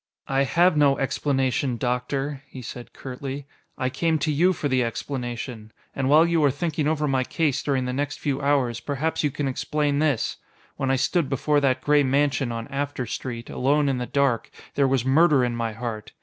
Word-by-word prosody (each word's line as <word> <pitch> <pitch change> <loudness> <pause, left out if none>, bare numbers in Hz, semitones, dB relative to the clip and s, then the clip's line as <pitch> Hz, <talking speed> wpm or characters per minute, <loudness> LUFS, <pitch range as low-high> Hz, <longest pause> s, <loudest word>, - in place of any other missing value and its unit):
"I 135 +1 +2
have 175 +5 +3
no 140 -2 +4
explanation. 135 -2 0
Doctor," 135 +3 -2
he 130 -2 -9
said 120 0 -8
curtly. 135 +1 -6 0.3
"I 130 -2 -1
came 165 +3 +1
to 150 +1 0
you 170 +6 +3
for 155 -5 -2
the 130 -2 +2
explanation. 120 -2 -5 0.2
And 135 -1 0
while 155 +3 +7
you 170 -2 +2
are 145 - +5
thinking 150 +2 -1
over 155 -1 +1
my 135 -2 +1
case 145 0 0
during 135 -3 0
the 125 - -2
next 145 +2 -2
few 140 -1 -1
hours, 135 -5 +1
perhaps 150 +5 -2
you 150 - +2
can 145 +1 -3
explain 145 +2 0
this: 145 -6 0 0.4
when 135 - -2
I 135 - +3
stood 150 +3 +1
before 145 +2 +2
that 130 -2 +1
gray 150 0 +4
mansion 140 -1 +1
on 115 0 -5
After 140 -2 -3
Street, 120 +1 -5
alone 145 +3 +1
in 135 -2 0
the 125 - -3
dark, 140 -5 +1 0.2
there 140 -1 +3
was 130 -2 +1
murder 140 -1 +4
in 120 -1 -2
my 115 -1 -2
heart. 115 -1 -6
135 Hz, 195 wpm, -24 LUFS, 125-145 Hz, 0.4 s, while